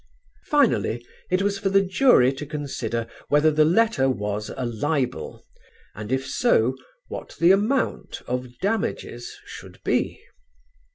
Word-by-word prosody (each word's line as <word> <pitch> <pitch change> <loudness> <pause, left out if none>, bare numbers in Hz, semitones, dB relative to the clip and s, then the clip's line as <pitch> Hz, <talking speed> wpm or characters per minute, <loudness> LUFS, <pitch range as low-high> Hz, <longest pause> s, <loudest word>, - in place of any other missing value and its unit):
Finally 120 - +2 0.2
it 185 +2 +1
was 200 0 0
for 195 - 0
the 195 0 +3
jury 190 - +4
to 135 - -7
consider 135 -6 -3 0.2
whether 150 +2 +4
the 155 0 +4
letter 175 -4 +3
was 105 -3 -2
a 130 - -2
libel 125 +3 -2 0.5
and 105 +3 -7
if 130 0 0
so 130 - +2 0.3
what - - -8
the 170 +2 +6
amount 215 +8 0
of 125 -1 -4
damages 210 - -3
should - - -11
be. - - 0
145 Hz, 130 wpm, -24 LUFS, 125-195 Hz, 0.5 s, the